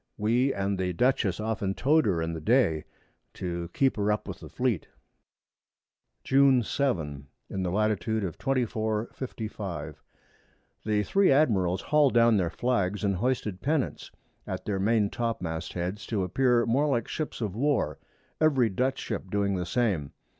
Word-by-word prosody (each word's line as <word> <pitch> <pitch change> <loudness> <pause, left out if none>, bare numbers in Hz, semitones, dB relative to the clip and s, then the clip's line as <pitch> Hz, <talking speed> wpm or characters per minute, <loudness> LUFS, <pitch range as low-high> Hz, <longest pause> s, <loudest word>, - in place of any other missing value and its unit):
We 120 +6 +2
and 100 -2 -2
the 90 -1 -1
Dutchess 110 -3 +1
often 105 -3 -2
tow'd 150 -1 +3
her 85 -5 +1
in 80 0 -3
the 80 - -5
Day, 105 - +2 0.5
to 85 -2 -4
keep 135 +3 +1
her 105 0 +1
up 105 - -2
with - - -6
the - - -10
Fleet. 120 - -1 1.4
June 135 -2 +4
7. 80 - -2 0.2
In 95 - -2
the 90 - -1
Lat. 105 +4 +2
of 105 - -2
24°. 110 +1 -1 0.9
55´´. 100 - -5 0.9
The 105 -1 +1
3 195 - +3
Admirals 100 - +3
hall'd 150 -4 +3
down 115 -2 +5
their 90 -4 +1
Flags, 105 -2 -1
and 100 -2 +1
hoisted 110 -4 -1
Pennants 145 -2 -1 0.4
at - - -5
their 100 -2 -1
Main 105 0 +2
topmast 95 -9 -3
Heads, 90 +4 -4
to 105 -4 -1
appear 120 +5 +2
more 135 +6 +2
like 120 -6 0
Ships 155 - -4
of 105 -5 -3
War, 120 - 0 0.4
every 135 -7 +4
Dutch 130 +7 0
Ship 100 -4 -5
doing 100 0 0
the 90 -1 -2
same. 100 - 0
105 Hz, 155 wpm, -28 LUFS, 95-125 Hz, 1.4 s, down